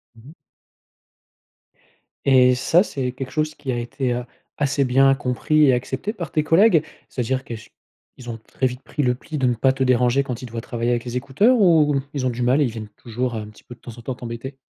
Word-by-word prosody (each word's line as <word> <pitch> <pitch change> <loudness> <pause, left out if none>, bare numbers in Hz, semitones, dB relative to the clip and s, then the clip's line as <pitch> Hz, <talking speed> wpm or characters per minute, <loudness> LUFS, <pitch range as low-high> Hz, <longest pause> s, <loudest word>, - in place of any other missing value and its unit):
Mmh 115 - -17
mh. 155 - -14 1.9
Et 125 -2 +5
ça, 165 +7 +3
c'est 130 -10 -2
quelque 130 0 -6
chose 155 +2 -1
qui 135 -3 -5
a 120 - -2
été, 125 +1 -2
heu, 120 0 -3 0.3
assez 140 -1 +1
bien 135 +2 +4
compris 145 +3 +2
et 130 - +5
accepté 130 +10 -2
par 175 -8 -7
tes 155 - +1
collègues? 165 0 +5 0.2
C'est-à-dire 130 +1 -2
que 120 - -6
ch 110 0 -13 0.5
ils 120 -2 -10
ont 115 - -5
très 130 +4 -4
vite 125 +1 -2
pris 145 - -3
le 125 - +2
pli 150 +5 -7
de 130 - +1
ne 125 - +3
pas 130 +4 +2
te 135 0 -1
déranger 125 +1 +3
quand 125 -2 -5
ils 130 - -6
te 120 - -11
voient 115 - -3
travailler 120 0 -2
avec 120 -1 0
les 125 0 -4
écouteurs, 150 - +3
ou 155 -7 +4
ils 140 -3 -2
ont - - +2
du 120 0 -4
mal 130 +5 +3
et - - +5
ils 125 - -1
viennent 110 -2 -7
toujours 120 +1 -3
un 110 -1 -4
petit 105 - -18
peu, 120 - -11
de - - -33
temps 120 -2 -10
en - - -10
temps, 125 +2 -4
t'embêter? 120 +3 -7
130 Hz, 240 wpm, -22 LUFS, 120-140 Hz, 1.9 s, Et